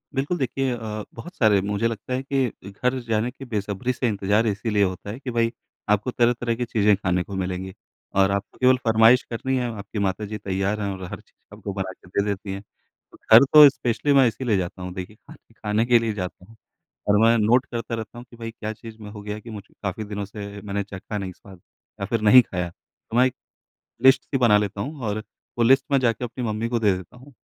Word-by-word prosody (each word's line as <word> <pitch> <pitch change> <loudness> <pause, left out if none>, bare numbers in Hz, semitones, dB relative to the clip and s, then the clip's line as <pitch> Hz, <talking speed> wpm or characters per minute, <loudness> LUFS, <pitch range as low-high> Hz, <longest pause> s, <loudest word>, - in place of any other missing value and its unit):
बिल्कुल 140 +7 0
देखिए 135 0 -1
अ, 110 -2 -5
बहुत 175 +11 -10
सारे 105 -4 +4
मुझे 105 +3 0
लगता 115 +2 -5
है 130 - 0
कि 130 -8 -2
घर 125 +6 -1
जाने 115 +1 +1
के 135 +1 -11
बेसब्री 105 +1 -2
से 125 - -1
इंतज़ार 105 +1 +1
इसीलिए 105 0 +1
होता 95 +1 -3
है 115 - -7
कि 135 -3 -5
भई 115 0 +1 0.4
आपको 105 +4 +2
तरह-तरह 120 -1 +1
की 125 - -2
चीज़ें 105 -3 +3
खाने 90 -2 0
को 100 - -8
मिलेंगी 95 0 -3 0.4
और 95 0 +4
आपको 100 0 -3
केवल 130 0 +5
फ़रमाइश 115 +3 +6
करनी 130 +3 -2
है 125 -1 -1
आपकी 105 0 -6
माताजी 100 +2 -2
तैयार 100 +2 -2
हैं 100 - -1
और 95 - -8
हर - - -6
चीज़ - - -19
आपको 100 - -6
बना 95 -1 -3
के 90 - -18
दे 100 +2 0
देती 100 -1 -3
हैं। 100 - -6 0.5
तो - - -16
घर 115 +4 +10
तो 150 -1 +11
स्पेशली 135 +2 0
मैं 135 -2 +6
इसीलिए 115 -2 0
जाता 90 0 -4
हूँ 90 0 -5
देखिए 95 +2 -7
खाने - - -17
खाने 110 +1 0
के 120 -1 +5
लिए 115 -1 -1
जाता 90 -2 -6
हूँ, 115 +3 -18 0.5
और 105 0 +4
मैं 115 +1 +5
नोट 120 +5 +3
करता 115 -1 -3
रहता 110 +1 -7
हूँ 120 - -9
कि 120 - -15
भई 115 -1 -6
क्या 110 -1 -5
चीज़ 110 0 -11
में 105 - -8
हो 105 - -9
गया 105 +1 -5
कि 115 - -12
मुझे 105 -2 -10
काफ़ी 100 +2 -3
दिनों 105 -1 -5
से 100 +1 -8
मैंने 100 0 -3
चखा 100 +2 -7
नहीं 95 -2 -4
स्वाद 95 +1 -15 0.4
या 100 - -2
फिर 115 +2 -1
नहीं 110 +4 +8
खाया 90 -5 -4
तो 110 +6 -9
मैं 125 - +6
एक 130 0 -1 0.7
लिस्ट 130 0 +6
सी 135 - -2
बना 115 -5 +5
लेता 100 -1 -3
हूँ 145 +5 -5
और 110 +1 -2 0.4
वो 120 - +4
लिस्ट 130 +2 +5
मैं 135 - +5
जाके 120 -1 0
अपनी 120 +1 -5
मम्मी 110 +1 -2
को 120 - 0
दे 105 -3 +4
देता 95 +6 -11
हूँ। 135 +3 -15
110 Hz, 230 wpm, -24 LUFS, 100-120 Hz, 0.7 s, तो